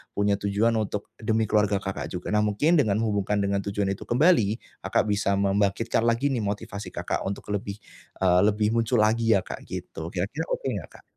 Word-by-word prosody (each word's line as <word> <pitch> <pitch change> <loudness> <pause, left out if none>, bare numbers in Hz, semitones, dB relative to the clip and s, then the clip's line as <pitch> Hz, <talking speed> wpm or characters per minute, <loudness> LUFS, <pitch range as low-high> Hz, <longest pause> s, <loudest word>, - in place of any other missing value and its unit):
punya 100 0 +2
tujuan 100 +3 +2
untuk, 105 -1 -4
demi 110 0 +1
keluarga 105 -1 +2
Kakak 95 0 -4
juga. 90 -1 -5
Nah 105 - +4
mungkin, 145 +11 +2
dengan 105 -6 +1
hubungkan 105 -1 0
dengan 100 0 0
tujuan 100 0 -1
itu 100 - -11
kembali, 120 - +4 0.3
Kakak - - +1
bisa 100 -1 +1
membangkitkan 100 +3 +1
lagi 115 +5 +2
nih 125 - 0
motivasi 100 -1 -4
Kakak - - -2
untuk 100 - -6
lebih, 100 0 -3 0.5
eee, 90 -1 +5
lebih 105 0 +1
muncul 115 +1 +1
lagi 115 +1 +3
ya - - -2
Kak - - -6
gitu, 80 - -6
kira-kira 100 - -3
oke - - -3
nggak 95 - -5
Kak? - - -19
105 Hz, 190 wpm, -26 LUFS, 100-110 Hz, 0.5 s, eee